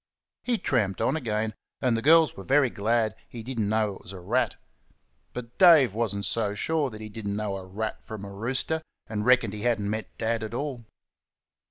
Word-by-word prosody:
He 245 -2 0
tramped 105 - 0
on - - +1
again, 110 -6 -1 0.3
and 125 -3 +2
the 115 - -1
girls 160 +3 +6
were 95 - -8
very 135 0 +3
glad 110 0 +1
he 115 -2 -8
did 125 0 -5
n't 105 - +1
know 110 -1 +1
it - - -18
was - - -8
a 95 - -8
rat. 90 - 0 0.8
But 120 -1 -8
Dave 160 - +7
was 110 -2 0
n't 100 0 -2
so 105 +1 0
sure 155 +5 0
that 110 -2 -10
he 110 - -6
did 105 0 -7
n't 100 - -1
know 105 -2 -2
a 95 - -8
rat 110 +3 -4
from 105 -2 -7
a 100 - -8
rooster, 130 +9 0 0.2
and 105 0 -3
reckoned 120 -5 +4
he 105 - -6
had 120 -1 +2
n't 100 0 -2
met 110 +1 -4
Dad 115 0 0
at 110 +1 -5
all. 130 -3 -4
110 Hz, 220 wpm, -27 LUFS, 105-125 Hz, 0.8 s, Dave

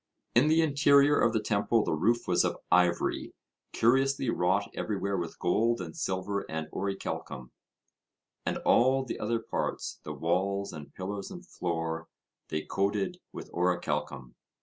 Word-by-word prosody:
In 125 +6 +5
the 160 +1 +4
interior 145 -1 +5
of 115 - +4
the 110 - +1
temple 105 +1 +1
the - - -1
roof 115 +10 +1
was - - +3
of - - -1
ivory, 90 -1 +2 0.4
curiously 135 +1 +2
wrought 95 +3 +1
everywhere 100 -2 -2
with 85 -3 -4
gold 115 +6 +1
and 85 -3 -6
silver 95 +2 -2
and 80 0 -3
orichalcum; 80 -9 -4 0.9
and - - -1
all 130 +2 +4
the - - -5
other 115 +2 0
parts, 115 - -3
the 75 - -6
walls 95 +6 -1
and 75 -3 -10
pillars 100 +1 -5
and 180 0 -9
floor, 80 - -3 0.4
they 75 0 -2
coated 100 0 -1
with - - -9
orichalcum. 75 -7 -1
100 Hz, 145 wpm, -29 LUFS, 85-115 Hz, 0.9 s, In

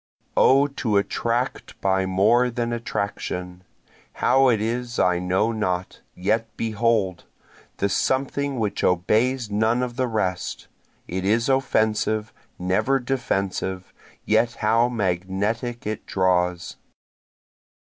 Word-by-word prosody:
O 135 +2 +5
to 120 -7 -1
attract 120 +5 -2
by 95 -1 +1
more 105 +7 +3
than 120 0 -2
attraction! 90 -5 -4 0.5
How 135 +1 +3
it 115 -3 +2
is 120 +2 -2
I 90 -1 +3
know 95 +5 +1
not 95 -5 -2
yet 110 +5 0
behold! 110 -4 0 0.5
the 100 - +1
something 135 +5 0
which 105 -3 -2
obeys 110 +6 +1
none 110 +4 +2
of 120 -1 -5
the 130 -1 +1
rest, 95 -6 -2 0.4
It 95 +1 -3
is 115 +6 +2
offensive, 110 -4 +1 0.2
never 95 +9 +1
defensive 100 -7 -2 0.3
yet 120 0 +2
how 115 +3 +2
magnetic 105 +3 -2
it 110 0 -4
draws. 90 -2 0
110 Hz, 110 wpm, -23 LUFS, 95-120 Hz, 0.5 s, O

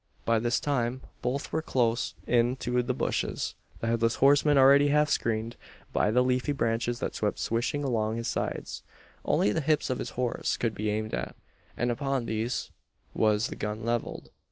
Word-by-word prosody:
By 115 -1 +3
this 120 +1 +1
time 130 -3 -1 0.2
both 130 +3 -2
were 160 - +1
close 120 -6 0
in 120 +1 +2
to 125 -1 0
the 125 +1 -1
bushes - - -1 0.3
the - - -2
Headless 115 0 +1
Horseman 145 +1 +4
already 140 +2 +7
half 150 +1 +3
screened 115 0 -1 0.4
by - - +2
the 125 +3 +3
leafy 130 +3 +1
branches 120 -2 0
that - - -2
swept - - -1
swishing 120 +6 -1
along 110 -4 0
his 115 - -3
sides. - - -3 0.4
Only 105 - +2
the 160 - 0
hips 150 -2 +1
of 130 - -2
his 120 - -4
horse 125 -2 -1
could 115 -2 -1
be 105 0 -2
aimed 110 +1 -2
at; - - -3 0.4
and 120 +1 +1
upon 135 0 -1
these 110 +2 -2 0.4
was 110 +1 +2
the - - -6
gun 105 +1 -4
levelled. 120 0 -3
120 Hz, 180 wpm, -28 LUFS, 115-135 Hz, 0.4 s, already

